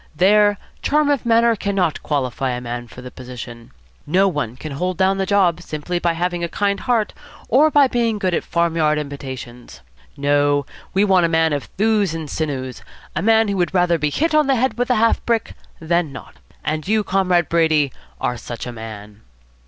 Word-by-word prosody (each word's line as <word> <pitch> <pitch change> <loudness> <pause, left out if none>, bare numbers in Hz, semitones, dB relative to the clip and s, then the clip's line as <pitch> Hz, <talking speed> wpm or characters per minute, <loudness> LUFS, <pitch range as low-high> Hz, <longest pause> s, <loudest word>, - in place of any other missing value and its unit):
There 205 +4 +4 0.2
charm 295 0 +2
of 275 -4 -1
manner 230 0 +4
cannot 195 -6 -1
qualify 130 -2 -1
a 125 - -4
man 120 0 -5
for 125 +2 -12
the 125 - -8
position. 120 -2 -9 0.4
No 185 +6 +3
one 145 - -2
can 150 +4 -8
hold 180 +5 -2
down 190 +1 +2
the 190 - -1
job 185 -4 +2
simply 175 +2 -4
by 170 -1 +1
having 175 +1 -2
a 170 - -1
kind 200 +1 0
heart 235 -4 0 0.4
or 290 +6 +5
being 245 -7 +3
good 185 -3 -1
at - - 0
farmyard 165 -3 +1
imitations. 130 - -7 0.4
No. 145 0 +2 0.3
We 200 +2 +4
want 185 -4 +4
a - - -5
man 160 -1 +2
of 145 -2 -2
thews 205 -4 0
and 160 -2 -5
sinews, 135 -5 -4 0.3
a 155 - 0
man 225 +2 +4
who 200 -1 -1
would 180 +1 0
rather 175 -2 +3
be 150 0 +1
hit 315 - 0
on 305 -2 +4
the 270 - +3
head 260 +2 0
with 245 +1 -1
a 250 - +3
half 230 +1 +2
brick 230 -2 -1 0.3
than 165 -1 0
not. 125 -3 -11 0.3
And 155 +1 -2
you, 215 +1 +2
Comrade 185 -3 +1
Brady, 155 -5 +2 0.3
are 125 - -1
such 115 +1 -7
a 125 - -5
man." 110 -2 -9
170 Hz, 190 wpm, -20 LUFS, 140-205 Hz, 0.4 s, or